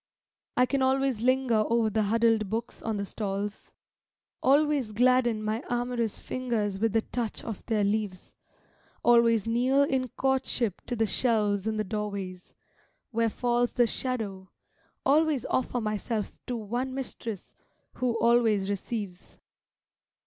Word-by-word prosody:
I 250 - +6
can 275 +1 -1
always 265 -3 +2
linger 255 -3 +3
over 230 -1 +2
the 220 - +1
huddled 225 0 +2
books 225 +3 -4
on 220 -2 -2
the 200 - -2
stalls, 200 0 -4 0.7
Always 280 -4 +3
gladden 240 -1 +3
my 215 +2 -2
amorous 240 -2 -1
fingers 220 -6 -2
with 225 0 +1
the 225 -1 +2
touch 235 -3 -4
of 225 -4 -6
their 215 -3 +1
leaves, 200 -2 -2 0.7
Always 230 -3 +5
kneel 250 +5 +3
in 265 -2 0
courtship 255 -5 -1
to 245 - -2
the 225 -1 +2
shelves 210 -1 +1
in 220 0 -1
the 215 - +1
doorways, 200 -3 -5 0.6
where 230 0 +1
falls 240 +1 0
The 245 - +4
shadow, 215 -6 -3 0.6
always 295 -2 +3
offer 250 -1 0
myself 215 0 -2 0.2
to 245 - -2
one 240 +5 -3
mistress, 235 -6 -6 0.4
who 240 -2 0
always 225 -4 +3
receives. 200 -2 -5
230 Hz, 135 wpm, -28 LUFS, 210-250 Hz, 0.7 s, I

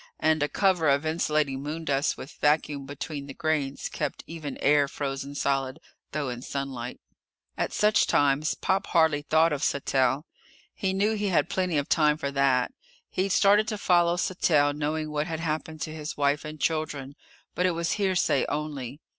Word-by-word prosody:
And 155 0 +2
a 145 - +1
cover 185 -6 +2
of 140 +2 +2
insulating 155 -4 0
moondust 145 -1 -1
with 140 - -9
vacuum 150 -2 +1
between 145 0 -6
the 135 - -8
grains 145 -3 -1
kept - - -4
even 155 -4 -6
air 145 0 +3
frozen 140 0 -4
solid, 135 -2 0 0.3
though 145 -1 -2
in 120 -1 -5
sunlight. 130 -3 -5 0.6
At - - -2
such 210 0 +3
times 145 +1 +2
Pop 195 +3 0
hardly 160 -4 +3
thought 160 +2 +3
of 140 - -3
Sattell. 135 0 +1 0.5
He 190 - -1
knew 200 +3 +1
he 210 -1 -1
had 180 -2 +2
plenty 180 -4 0
of 145 - 0
time 150 -2 +3
for 140 -3 -3
that. 135 -2 +2 0.4
He'd 190 +2 0
started 205 +3 +4
to 215 -2 -2
follow 175 -3 +3
Sattell 155 -6 +2
knowing 155 +1 -2
what 150 +1 -1
had 160 -2 -3
happened 155 -1 -3
to 155 - -4
his 155 +1 -6
wife 145 +1 +1
and 155 0 -7
children, 145 -4 -2 0.4
but 180 - +1
it 180 - 0
was 170 0 -1
hearsay 190 -8 +2
only. 145 -2 -4
150 Hz, 170 wpm, -27 LUFS, 140-165 Hz, 0.6 s, started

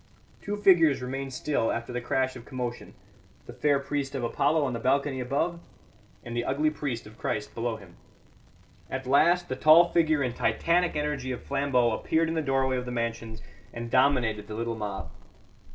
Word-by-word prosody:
Two 205 0 -3
figures 175 -8 +5
remained 135 +2 -4
still 130 -3 -1
after 120 +1 -4
the 125 - -2
crash 130 +2 -1
of 120 - -9
commotion: 125 -1 -6 0.5
the - - -10
fair 145 -1 +2
priest 140 0 -3
of 130 - -3
Apollo 145 +6 +1
on 130 - -2
the 115 - -3
balcony 135 +2 +1
above, 145 +7 -1 0.7
and 120 -1 -6
the 120 - 0
ugly 150 +5 +1
priest 140 -6 -4
of 105 +1 -14
Christ 105 -1 -3
below 115 0 -2
him. 95 -5 -14 0.9
At 130 0 -4
last 170 +7 +3
the 130 - -3
tall 160 +5 +6
figure 155 -4 +2
and 125 -2 -2
titanic 175 0 +1
energy 150 -3 -2
of 125 - -5
Flambeau 135 -4 +1
appeared 160 +8 0
in - - -1
the 160 - 0
doorway 135 -2 +1
of 125 - -4
the 125 - -5
mansions 115 -2 -4 0.3
and 115 0 -7
dominated 120 -6 +2
the 105 - -6
little 115 +1 -2
mob. 105 -3 -5
130 Hz, 185 wpm, -27 LUFS, 120-150 Hz, 0.9 s, tall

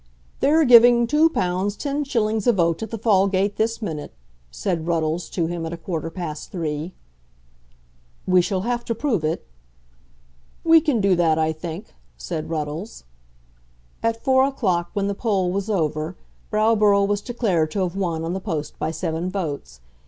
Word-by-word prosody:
"They're 315 +2 +4
giving 240 -1 +7
£2 300 +6 +4
10_s._ 215 - -1
a - - +7
vote 170 -4 +1
at 225 - -4
the 225 - -4
Fallgate 200 -2 +2
this 225 +1 -1
minute," 155 -7 -5 0.4
said 160 - -3
Ruddles 165 0 -1
to 170 - -1
him 170 0 -4
at 165 +1 -4
a - - -5
quarter 165 -1 -4
past 160 -3 -6
three. 160 0 -4 1.3
"We 185 -1 +4
shall 185 +1 -1
have 240 +3 -2
to 230 - -2
prove 225 - -1
it." 155 +2 -2 1.2
"We 325 -1 +6
can 290 -8 +1
do 195 -2 +3
that, 165 -2 +3
I 160 0 +1
think," 165 +5 -8 0.2
said 160 -3 -5
Ruddles. 155 +5 -4 1.0
At 230 0 -1
four 260 0 +4
o'clock, 185 -11 -1
when 200 -1 -1
the 200 - 0
poll 195 -4 0
was 200 +3 -2
over, 155 -3 -1 0.3
Browborough 210 -2 +3
was 205 0 0
declared 205 -10 0
to 195 - -2
have 180 0 -3
won 170 -5 -2
on 165 +2 -2
the 190 - -2
post 155 -7 -4
by - - -1
seven 160 +2 -3
votes. 145 - -5
190 Hz, 160 wpm, -22 LUFS, 165-225 Hz, 1.3 s, giving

